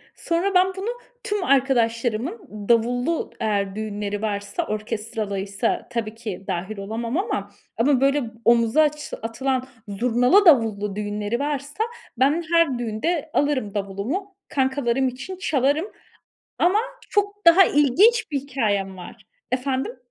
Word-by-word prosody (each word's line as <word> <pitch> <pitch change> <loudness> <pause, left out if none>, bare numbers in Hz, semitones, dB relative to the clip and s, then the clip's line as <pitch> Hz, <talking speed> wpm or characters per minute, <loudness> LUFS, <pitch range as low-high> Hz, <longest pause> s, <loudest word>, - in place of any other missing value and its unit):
Sonra 350 +4 -1
ben 365 +1 +6
bunu 400 +5 -3 0.3
tüm 410 -2 -1
arkadaşlarımın 250 - +1 0.3
davullu, 245 +7 +1
eğer 200 -3 -1
düğünleri 205 -1 -4
varsa, 210 +10 -2
orkestralıysa 210 -1 -3
tabii 225 -3 -3
ki 215 -5 -6
dâhil 190 +5 -3
olamam 230 - -3
ama, 205 - -2 0.3
ama 260 +3 +3
böyle 275 0 +3 0.2
omuza 235 +5 +4
aç 300 -1 -1
atılan 255 +3 -2 0.2
zurnalı, 250 - +3
davullu 215 - +4
düğünleri 210 +2 -2
varsa, 290 +6 -2 0.3
ben 290 +6 +3
her 330 -7 +3
düğünde 285 +9 -2
alırım 265 -8 0
davulumu, 215 - -3
kankalarım 265 -1 +1
için 260 +9 -6
çalarım. 290 -1 +1 0.7
Ama 365 +4 +4 0.3
çok 410 0 0
daha 345 +3 +9
ilginç 345 - +4
bir 280 -3 -1
hikâyem 210 -8 -1
var. 180 - -11 0.3
Efendim? 260 0 -1
250 Hz, 120 wpm, -23 LUFS, 215-300 Hz, 0.7 s, daha